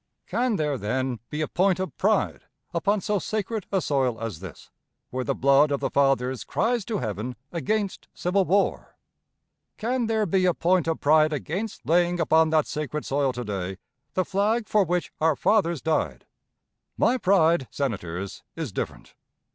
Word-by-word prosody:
Can 245 -2 0
there, 150 -6 -1
then, 125 +3 -1
be 150 +1 -3
a 155 - 0
point 185 0 +2
of 185 - -3
pride 210 +1 +1 0.3
upon 200 +4 +1
so 210 0 0
sacred 215 +1 -3
a 195 - +2
soil 130 -7 0
as 115 -7 -5
this, 95 -4 -11 0.4
where 130 0 -2
the - - -1
blood 140 +2 +4
of 140 -1 0
the - - -2
fathers 130 -2 +2
cries 235 -1 0
to 225 - -2
heaven 110 +2 -4 0.2
against 200 +3 -2
civil 190 +2 +1
war? 195 +2 0 0.8
Can 240 +1 -1
there 220 -1 +1
be 185 0 +2
a 180 - +2
point 180 -1 +2
of 165 - -1
pride 155 +1 +5
against 185 +9 -4
laying 175 +1 +2
upon 160 0 +4
that 155 -1 +3
sacred 150 -1 -4
soil 140 -1 +1
to 125 0 -4
day 95 -2 -4 0.4
the 185 - +1
flag 215 +4 +1
for 210 -1 +3
which 180 +1 -1
our 160 -1 +4
fathers 170 - +2
died? 160 0 -1 0.7
My 255 - +3
pride, 170 - +3
Senators, 100 -8 -4
is 160 -8 -4
different. - - -5
160 Hz, 165 wpm, -25 LUFS, 135-195 Hz, 0.8 s, pride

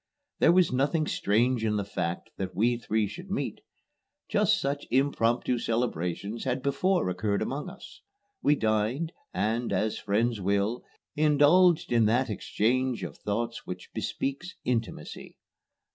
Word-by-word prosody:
There - - +6
was 180 -1 +4
nothing 145 +5 +1
strange 120 0 +1
in 105 -1 +1
the 100 -1 -1
fact 85 -3 -3
that 95 -1 -4
we 120 +4 +3
three 110 -2 0
should 175 - -8
meet. 205 - -3 0.7
Just 205 0 +3
such 140 -2 -2
impromptu 125 -2 +1
celebrations 110 -2 -2
had 130 0 -1
before 180 - +1
occurred 100 +3 0
among 145 +6 -4
us. 195 +3 -13 0.4
We 150 - +4
dined, 110 +8 0 0.2
and, 115 +2 -1
as 105 +3 0
friends 110 +1 0
will, 100 +5 0 0.3
indulged 155 +3 +4
in 115 -2 +4
that 120 +2 +2
exchange 125 +4 0
of - - -5
thoughts 115 +3 -3
which 90 - -7
bespeaks 140 +7 -3
intimacy. 115 -2 -3
120 Hz, 135 wpm, -28 LUFS, 105-145 Hz, 0.7 s, There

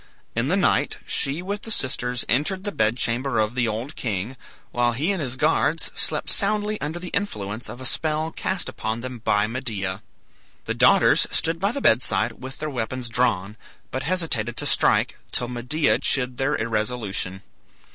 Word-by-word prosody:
In 115 +3 0
the 180 - +2
night 190 - +2
she 145 +6 0
with 200 +2 -3
the 225 - -9
sisters 125 - +2
entered 155 - +1
the 205 - -2
bed 110 - +1
chamber 125 +2 0
of 110 +1 +1
the 120 -2 +1
old 115 +7 -4
king, 110 +2 -3 0.4
while 120 0 +1
he 150 +11 0
and 190 -4 -2
his 130 -3 -2
guards 155 +3 +1
slept - - -1
soundly 210 0 +2
under 155 +3 -3
the 175 0 -6
influence 110 - -3
of - - -8
a 130 - -7
spell 155 +3 0
cast 190 +2 -2
upon 110 +1 -3
them 125 -1 -6
by 105 -2 +2
Medea. 105 -5 -3 0.6
The - - -1
daughters - - +5
stood 165 0 0
by 200 +3 +1
the 280 - -4
bedside 110 - +3
with 130 +1 -7
their 155 - -4
weapons 125 0 -3
drawn, 110 -4 0 0.3
but 130 - -2
hesitated 140 -9 0
to - - -3
strike, - - +2
till 120 - -2
Medea 125 +5 +1
chid 125 -2 +1
their 140 +2 +1
irresolution. 105 -4 -2
125 Hz, 175 wpm, -24 LUFS, 110-155 Hz, 0.6 s, daughters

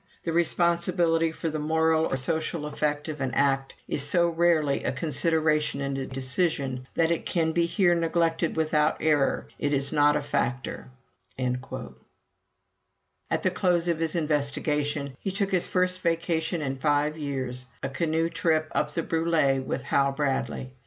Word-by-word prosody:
The 165 - -2
responsibility 170 -1 +2
for 160 0 -3
the 155 - -3
moral 160 +1 +2
or 135 - +1
social 160 +3 -2
effect 150 0 -2
of 150 -3 -5
an 130 -3 -2
act 135 -1 +1
is - - -1
so 170 +4 +3
rarely 165 -4 +2
a - - +1
consideration 155 +1 +1
in 140 -1 -2
a 135 -1 -3
decision, 130 -1 -1
that 165 0 +2
it 170 - 0
can 165 -2 0
be 170 +1 +2
here 175 0 +3
neglected 165 0 +1
without 155 -1 +2
error. 150 -3 +2
It 145 0 0
is 140 0 0
not 145 -1 +4
a 150 - +1
factor." 130 -3 -2 0.5
At 125 -1 0 1.9
the 185 - +2
close 180 -2 +1
of 170 -2 0
his 165 0 -1
investigation, 150 -2 -1
he - - -3
took 195 +1 -1
his 180 -2 +1
first 185 0 0
vacation 165 -1 0
in 135 -1 -2
five 145 +2 +1
years 130 -4 -4 0.2
a - - 0
canoe 160 +4 0
trip 160 -2 0
up - - +1
the 165 +2 -2
Brulé 160 -5 +1
with - - -3
Hal 140 0 +2
Bradley. 135 -2 -2
155 Hz, 160 wpm, -27 LUFS, 140-165 Hz, 1.9 s, not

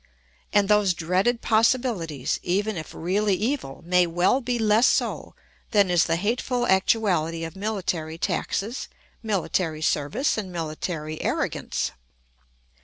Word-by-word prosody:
And 205 -1 +3
those 205 -3 +3
dreaded 185 +8 +1
possibilities, 220 - +1
even 205 +4 0
if 160 -2 -6
really 195 +4 +1
evil, 220 - -3
may 180 0 +3
well 175 +10 +2
be 245 -1 -1
less 220 +2 +4
so - - 0 0.3
than 200 -4 +3
is 175 -1 +4
the 165 - +1
hateful 240 +6 -1
actuality 190 -5 +2
of 165 +2 -6
military 185 -6 -3
taxes, 200 +6 -2 0.3
military 180 -6 -1
service, 200 - 0
and 190 -3 -6
military 155 -1 -4
arrogance. 65 - -1
190 Hz, 120 wpm, -25 LUFS, 165-220 Hz, 0.3 s, less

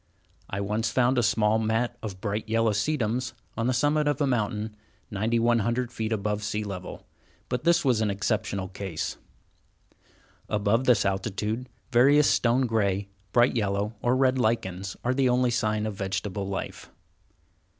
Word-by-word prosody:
I 100 - -3
once 105 +2 -1
found 125 +2 +2
a - - +4
small 110 -1 +2
mat 115 +2 0
of 100 -4 -6
bright 105 +1 -3
yellow 115 0 +2
sedums 120 +2 -1 0.2
on 115 +1 -1
the - - +2
summit 145 +4 +2
of 145 -3 +1
a 145 - +2
mountain, 110 -4 -1 0.4
9100 115 +3 +1
feet 110 -1 -3
above 105 -1 -1
sea 105 +1 -2
level, 100 -3 -7 0.4
but 125 +3 -2
this 170 -1 +4
was 120 -5 +3
an 110 - +1
exceptional 100 -1 -1
case. 95 -3 -4 1.3
Above 105 +4 +1
this 120 -6 +4
altitude, 105 +5 -2 0.2
various 140 +5 +5
stone 125 +2 +3
gray, 100 -4 0 0.2
bright 120 +4 +4
yellow, 105 -1 0
or 120 +1 +2
red 130 0 +2
lichens, 95 -5 -1
are 125 - +1
the 130 -1 +2
only 125 0 +2
sign 110 -2 0
of 110 - -2
vegetable 95 0 -3
life. 100 0 -5
110 Hz, 150 wpm, -27 LUFS, 100-125 Hz, 1.3 s, various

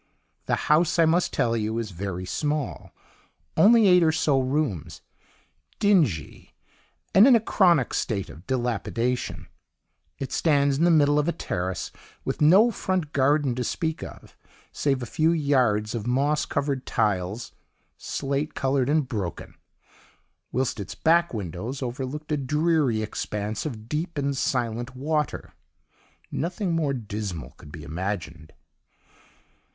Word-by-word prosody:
"The - - +2
house, 165 +3 +3
I 165 - +5
must 170 +3 +2
tell 115 -1 +1
you, 110 0 -1
is 115 -3 -3
very 90 0 -5
small 145 +8 -3 0.6
(only 220 +5 +6
eight 180 -1 +6
or 160 -1 +4
so 150 -3 +2
rooms), 130 - -2 0.8
dingy, 155 - +1 0.6
and 200 +6 +8
in 260 - +7
a - - +5
chronic 175 - +3
state 100 -4 -1
of 85 +5 -13
dilapidation; 125 -1 -2 0.7
it 135 - -5
stands 140 -3 +2
in 165 - +4
the - - +5
middle 145 -3 +4
of 150 - 0
a - - +3
terrace 90 - -3 0.3
with - - -3
no 190 +10 +6
front 185 -7 -2
garden 140 0 +2
to 125 +1 -2
speak 160 +5 -2
of, - - -10 0.4
save 135 -3 0
a - - -3
few 155 +7 +1
yards 125 -9 +1
of 115 -1 -4
moss 145 +5 +1
covered 140 -2 -2
tiles, 105 0 -1 0.4
slate 140 +2 -3
coloured 135 -1 +1
and 150 -2 +2
broken, 100 -9 -5 1.0
whilst 130 -3 -1
its 100 - -6
back 170 +1 +3
windows 110 - -5
overlooked 135 +5 -5
a 150 - +2
dreary 150 -4 +1
expanse 105 +3 -3
of 110 -6 -8
deep 160 +4 -3
and 140 -1 0
silent 120 -1 -2
water. 150 +2 -2 0.8
Nothing 180 +2 -2
more 150 -4 0
dismal 105 - -5
could 75 - -13
be 75 -1 -9
imagined. 80 -1 -5
135 Hz, 135 wpm, -25 LUFS, 110-155 Hz, 1.0 s, and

